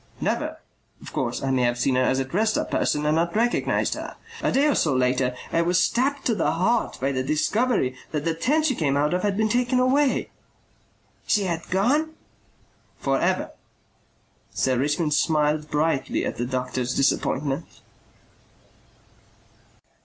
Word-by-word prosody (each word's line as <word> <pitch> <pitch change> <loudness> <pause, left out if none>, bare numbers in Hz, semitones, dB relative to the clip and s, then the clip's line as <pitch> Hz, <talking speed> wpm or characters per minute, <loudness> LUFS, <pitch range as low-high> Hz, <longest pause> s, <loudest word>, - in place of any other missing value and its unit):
"Never. - - -2 0.4
Of - - -11
course - - -2
I 135 - 0
may 130 -1 +2
have 120 0 +1
seen 130 +2 +1
her 130 - +2
as 130 +1 +2
a 135 - 0
dressed 215 +10 0
up - - -3
person 150 0 0
and 155 +1 +2
not 170 +2 0
recognized 235 +2 +1
her. - - -7 0.3
A - - +1
day 275 +2 +3
or 300 - +3
so 150 -5 +1
later 125 0 +1 0.2
I 165 - +3
was 175 +2 +2
stabbed 275 +7 0
to 235 - +2
the 195 - 0
heart 225 +7 0
by 135 +2 0
the 130 -1 -1
discovery 155 - 0 0.2
that 150 -1 -3
the 165 - +1
tent 290 - +1
she 280 - +2
came 140 - 0
out 150 +2 +1
of 180 - 0
had 200 0 0
been 220 0 +2
taken 245 +3 +1
away." 265 +2 +2 1.0
"She 210 - +2
had 170 -3 -3
gone?" 290 - +1 0.8
"For - - 0
ever." - - 0 1.0
Sir 130 -1 0
Richmond 150 +3 0
smiled 150 0 +1
brightly 150 -2 0
at - - -4
the 120 - -2
doctor's 125 -1 -2
disappointment. 140 +2 0
160 Hz, 165 wpm, -24 LUFS, 135-225 Hz, 1.0 s, day